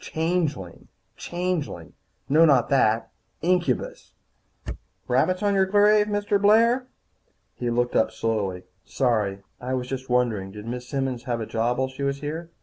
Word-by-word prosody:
Changeling, 160 - -2 0.3
changeling 175 - -4 0.3
No, 155 +4 +5
not 140 -7 +4
that. 115 -4 +2 0.3
Incubus! 175 -8 -1 0.5
He - - -8
shivered - - -3
again. - - -17 0.3
"Rabbits 180 +10 +1
on 205 -1 +2
your 190 -1 +3
grave, 210 +1 +4
Mr. 205 -1 0
Blair?" 230 +5 +4 0.7
He 120 - -3
looked 120 +1 0
up - - +3
slowly. 100 -5 -2 0.2
"Sorry. 105 -6 -1 0.2
I 130 +1 -3
was 125 -1 -3
just 130 0 -5
wondering. 120 -6 +1
Did 105 0 -9
Miss 125 +1 -6
Simmons 135 -3 -2
have 120 -2 -2
a 110 - -3
job 115 +3 -1
while 130 0 0
she 130 +1 -10
was 140 0 -1
here?" 160 +3 -5
130 Hz, 160 wpm, -24 LUFS, 120-180 Hz, 0.7 s, No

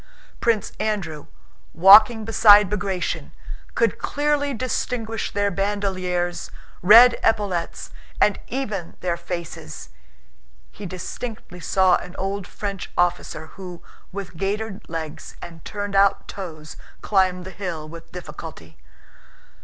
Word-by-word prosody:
Prince 230 -3 +1
Andrew, 175 -9 -3 0.5
walking 215 +5 +8
beside 210 -3 +6
Bagratión, 195 -4 -2 0.4
could - - +1
clearly 290 -1 0
distinguish 230 -2 -2
their 205 0 0
bandoliers, 185 -3 -2 0.3
red 230 +6 +8
epaulets, 200 -6 -1 0.3
and 210 - +3
even 210 -10 -4
their 175 -2 0
faces. 170 - -7 0.8
(He 200 - -8
distinctly 185 +1 -7
saw 185 +1 +3
an 180 - -10
old 195 0 -3
French 200 -3 -5
officer 175 -2 0
who, 180 -3 -9 0.3
with 185 -3 -7
gaitered 205 +2 -3
legs 160 -2 -6
and 165 -1 -10
turned 205 -1 -4
out 195 0 +3
toes, 160 -5 -8 0.3
climbed 185 -3 +1
the 190 - -7
hill 175 -5 -5
with 165 +1 -11
difficulty.) 150 - -9
195 Hz, 110 wpm, -23 LUFS, 175-210 Hz, 0.8 s, walking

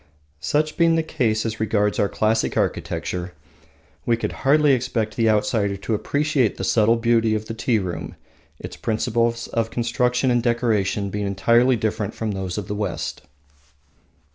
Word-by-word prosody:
Such 150 - 0
being 165 -1 +4
the 165 - +1
case 110 -8 0
as 110 -1 -3
regards 105 -1 +1
our 100 - +2
classic 110 -11 0
architecture, 90 -1 -2 0.7
we 115 -1 +1
could - - -3
hardly 145 +1 +3
expect 120 -4 -1
the 115 -1 +2
outsider 105 -1 +1
to 100 +3 -3
appreciate 145 +1 0
the - - -4
subtle 110 +3 +3
beauty 115 -1 +2
of 110 0 -3
the 115 - -5
tea 115 +1 0
room, 90 -5 -4 0.4
its - - -8
principles 115 +1 0
of 115 -1 -1
construction 125 +2 0
and 120 -1 +2
decoration 110 -5 0
being 105 0 -2
entirely 115 +6 +3
different 110 -2 -2
from 110 -1 -2
those 95 -2 -4
of 105 - -4
the - - -3
West. 105 0 -3
115 Hz, 160 wpm, -22 LUFS, 105-120 Hz, 0.7 s, being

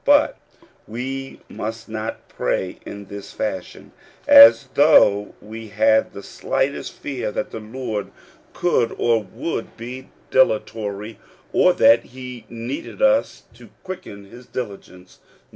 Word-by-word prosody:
But - - +4 0.5
we 135 +4 -6
must 115 +1 -6
not 110 0 -6
pray 95 - -2
in 100 0 -8
this 100 0 -9
fashion, 280 +1 -5 0.4
as 280 - +9
though 105 -9 +5
we 110 +1 -9
had 110 +1 +2
the 100 - -9
slightest 140 +7 -2
fear 130 -6 -4
that - - -4
the - - -6
Lord 110 -1 -5 0.4
could 125 -10 +1
or 115 -2 +2
would 115 - -5
be 125 +3 -8 0.2
dilatory, 110 -3 0 0.3
or 180 - +5
that 115 -3 +5
he 125 -1 -10
needed 120 +4 -6
us 270 +1 +2
to - - -16
quicken 140 - -8
his 120 +5 -14
diligence. 95 -6 -8
115 Hz, 125 wpm, -21 LUFS, 105-130 Hz, 0.5 s, as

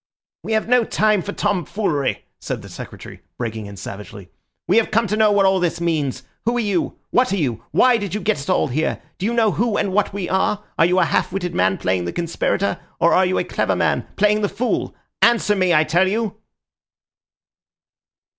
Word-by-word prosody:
"We 225 - -3
have 220 0 +1
no 250 0 +4
time 215 -2 +2
for 205 - -5
tomfoolery," 195 -7 -1
said - - -5
the - - -11
Secretary, - - -10 0.2
breaking 110 -3 -4
in 100 -1 -10
savagely. 100 -1 -9 0.4
"We 195 - +3
have 230 - +3
come 230 +2 +2
to 210 - -1
know 215 -1 +4
what 200 -1 +3
all 190 0 +3
this 175 -1 -1
means. 155 -6 -1 0.2
Who 235 +1 +1
are - - +1
you? 200 -6 -1
What 250 -4 +3
are - - +1
you? 125 - -2
Why 250 -1 +4
did 200 -3 -4
you - - -1
get 215 -3 0
us 140 - -7
all - - +2
here? 155 +6 -1 0.2
Do 190 - -1
you 235 - -1
know 225 -3 +3
who 225 0 0
and 190 - -1
what 210 +1 +1
we 195 -3 -4
are? 190 +2 0 0.2
Are 165 - +6
you 180 +1 +1
a 185 - +4
half - - 0
witted 180 -2 -3
man 95 +1 +2
playing 90 -1 -1
the 85 - -4
conspirator, 175 +3 -1 0.2
or 170 - +4
are 185 0 +4
you 185 - 0
a - - +1
clever - - -1
man - - 0
playing 210 +1 +3
the 205 - +1
fool? 235 +5 -2 0.3
Answer 230 -3 +4
me, 185 -2 +2
I 155 -2 +5
tell 175 +4 +2
you." 215 +1 -1
190 Hz, 210 wpm, -20 LUFS, 160-215 Hz, 0.4 s, Are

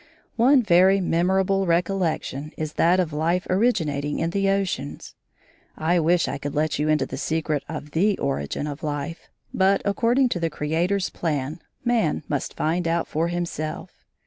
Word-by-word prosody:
One 255 +2 +5
very 190 0 +5
memorable 190 +2 +1
recollection 170 -4 -1
is 155 -1 -4
that 175 +3 +3
of 165 -4 0
life 170 +4 0
originating 160 -9 +1
in 165 - -1
the 195 +1 +1
oceans. 195 -7 -2 0.6
I 170 +3 +2
wish 170 +2 +2
I - - -3
could 145 0 -5
let 155 -1 0
you 150 +1 +1
into 155 0 +2
the - - -7
secret 155 -3 -1
of 150 -2 -6
the 195 +6 +2
origin 135 - -2
of 145 0 -6
life, 150 +2 -4 0.2
but, 195 +1 +3
according 235 +6 +2
to 180 - -2
the 165 -1 0
Creator's 170 +6 -1
plan, 150 -1 -2 0.3
man 230 -12 +1
must 145 -2 -3
find 170 +2 0
out 165 0 0
for 160 +2 -1
himself. 170 0 -5
170 Hz, 160 wpm, -24 LUFS, 155-190 Hz, 0.6 s, One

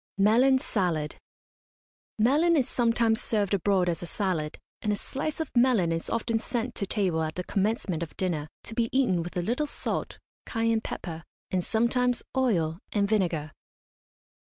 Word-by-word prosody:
MELON 235 +7 +5
SALAD. 170 -11 -1 1.0
Melon 300 +10 +4
is 260 - +2
sometimes 230 -2 +2
served 205 -3 0
abroad 195 -1 +2
as 170 -1 -1
a 175 - -5
salad, 165 -6 -2 0.2
and 210 - 0
a - - +2
slice 285 +9 -4
of 320 - -3
melon 240 -9 +4
is 165 0 -2
often 230 0 0
sent 240 +1 -2
to 200 - -1
table 185 -7 +1
at 155 0 -2
the 180 - -3
commencement 195 -3 -1
of 165 - -6
dinner, 165 -5 -1 0.2
to - - -6
be 230 0 0
eaten 230 -10 +2
with 175 +2 -6
a 175 - 0
little 250 - 0
salt, - - -3 0.3
cayenne 225 -1 +1
pepper, 165 -6 -6 0.3
and 185 -1 +1
sometimes 245 +3 +1
oil 175 -11 +1
and 200 -1 +2
vinegar. 175 -8 0
210 Hz, 160 wpm, -28 LUFS, 175-240 Hz, 1.0 s, MELON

